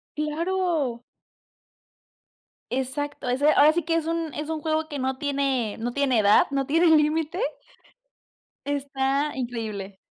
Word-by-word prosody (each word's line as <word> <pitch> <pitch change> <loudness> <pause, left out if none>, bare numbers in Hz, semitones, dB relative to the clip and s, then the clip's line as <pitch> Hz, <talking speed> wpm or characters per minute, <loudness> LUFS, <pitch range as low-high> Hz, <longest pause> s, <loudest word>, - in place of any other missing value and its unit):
¡Claro! 305 -5 -1 1.7
Exacto, 265 +2 -3
ese 275 +5 +3
ahora 300 +2 +6
sí 345 - +1
que, 330 +1 0
es 330 - 0
un 330 -1 -2
es 300 0 -4
un 315 -1 -3
juego 315 0 -1
que 290 -3 -5
no 260 0 -1
tiene 275 -6 -1
no 240 +2 -2
tiene 265 -3 +1
edad, 205 0 +5
no 275 -1 -1
tiene 330 +4 +3
límite. 315 +3 +2 1.2
Está 280 0 -1
increíble. 220 -6 -5
285 Hz, 130 wpm, -25 LUFS, 260-315 Hz, 1.7 s, ahora